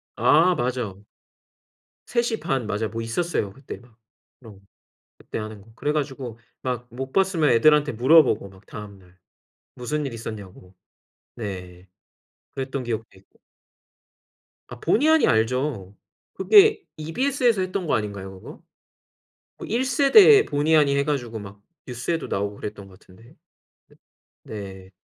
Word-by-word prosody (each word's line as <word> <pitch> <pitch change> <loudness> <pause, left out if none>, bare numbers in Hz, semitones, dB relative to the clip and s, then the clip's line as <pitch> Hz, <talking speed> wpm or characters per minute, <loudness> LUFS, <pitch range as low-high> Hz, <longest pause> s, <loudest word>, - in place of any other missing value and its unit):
아 175 +4 +4
맞아. 120 - -3 1.1
3:30 225 - -1
맞아요 105 +1 -2
뭐 115 +2 -5
있었어요 115 - -2
그때 135 +6 -9
막 120 -2 -22 0.4
그런 110 -6 -14 0.6
그때 - - -7
하는 110 -1 -7
거. 110 +3 -19
그래 145 - -1
가지고 135 -6 -4 0.2
막 125 -1 -4
못 130 +2 -6
봤으면 185 -5 +2
애들한테 150 +4 +4
물어보고 125 -4 +4
막 95 +1 -19
다음날 100 -4 -12 0.6
무슨 145 +4 -3
일이 130 - -6
있었냐고 100 -5 -9 0.6
네 95 -4 -7 0.7
그랬던 135 0 -4
기억도 115 -1 -3
있고. 95 - -30 1.3
아 120 - -10
보니하니 305 - +3
알죠. 115 -3 0 0.4
그게 425 0 +5 0.2
EBS에서 240 - 0
했던 185 -1 -3
거 - - +2
아닌가요 100 -3 -5
그거? - - -12 1.0
뭐 - - -7
1 240 +4 0
세대 385 +11 +6
보니하니 145 -1 +2
해 140 - +2
가지고 125 -6 -3
막 100 -1 -11 0.3
뉴스에도 130 +7 -3
나오고 100 +1 -2
그랬던 105 -1 -7
거 95 - -16
같은데. 110 +8 -19 0.5
네 - - -23 0.9
네. 95 - -17
125 Hz, 265 characters per minute, -24 LUFS, 105-155 Hz, 1.3 s, 세대